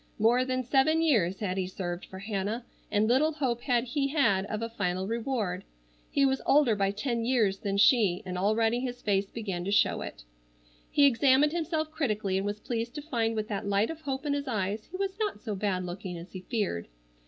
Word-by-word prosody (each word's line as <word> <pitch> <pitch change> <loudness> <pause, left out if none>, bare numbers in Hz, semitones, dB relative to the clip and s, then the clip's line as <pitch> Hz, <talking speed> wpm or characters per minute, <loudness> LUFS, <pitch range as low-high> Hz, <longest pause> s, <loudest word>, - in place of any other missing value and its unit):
More 235 +4 +4
than 255 0 -1
seven 290 +6 +3
years 205 - +2
had 190 -2 -1
he 185 - -1
served 175 -1 -5
for 190 - -9
Hannah, 205 +3 -3 0.2
and 210 +1 +2
little 285 +7 +3
hope 255 -6 -1
had 240 -3 +1
he 275 +3 -1
had 210 -10 +2
of 215 +2 -3
a 230 - -3
final 190 -4 -2
reward. 225 -5 -2 0.5
He 280 - +3
was 265 0 +1
older 275 -6 +4
by 195 -1 +1
ten 230 +3 -2
years 225 -6 +2
than 200 -1 -2
she, 205 -4 +4
and 180 -1 -4
already 220 +5 +2
his 245 -1 -5
face 200 -1 +1
began 195 -6 -4
to 190 - -3
show 205 - +3
it. - - -7 0.7
He 285 - +5
examined 275 +2 +4
himself 315 -2 -2
critically, 215 -11 -1
and 195 +1 -1
was 205 +1 -3
pleased 235 +3 -3
to 295 - -4
find 230 -7 -1
with 215 -1 -2
that 200 -1 -3
light 200 +5 +2
of 325 -1 -9
hope 275 -1 -4
in 290 - +1
his 285 0 -2
eyes 210 -2 -2
he 370 - -6
was 390 +1 -3
not 420 - -1
so 215 0 -4
bad 190 -2 -1
looking 180 0 -6
as 170 +2 -10
he 185 - -7
feared. 195 - -2
225 Hz, 210 wpm, -29 LUFS, 195-265 Hz, 0.7 s, He